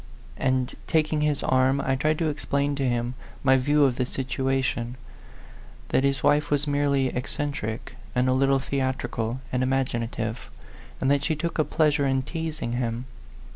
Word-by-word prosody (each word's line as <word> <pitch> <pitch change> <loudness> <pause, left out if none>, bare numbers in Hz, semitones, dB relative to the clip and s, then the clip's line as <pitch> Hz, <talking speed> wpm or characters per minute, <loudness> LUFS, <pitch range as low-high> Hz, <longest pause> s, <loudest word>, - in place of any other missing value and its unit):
And, 130 -1 +1
taking 155 -2 +2
his 150 -1 +1
arm, 130 +1 +3
I 135 -1 +1
tried 155 +3 +1
to 160 -1 +1
explain 145 -1 0
to 135 -2 0
him 120 0 -1 0.3
my 135 -1 +5
view 145 +3 +3
of 130 -3 +3
the 125 - +1
situation 130 -2 -1 0.9
that 130 - +2
his 140 -1 +1
wife 145 0 +3
was 145 0 +1
merely 140 -2 +2
eccentric, 125 -3 -4 0.2
and 125 +1 +3
a 130 - +3
little 135 +1 +3
theatrical 130 -3 -2
and 125 - +1
imaginative, 120 -3 -1 0.5
and 130 - +2
that 140 -1 +2
she 155 - +1
took 170 +2 -3
a - - +5
pleas 150 -2 +2
ure 140 - +2
in 135 0 +1
teasing 160 -3 -4
him. 120 0 -2
135 Hz, 165 wpm, -26 LUFS, 130-145 Hz, 0.9 s, my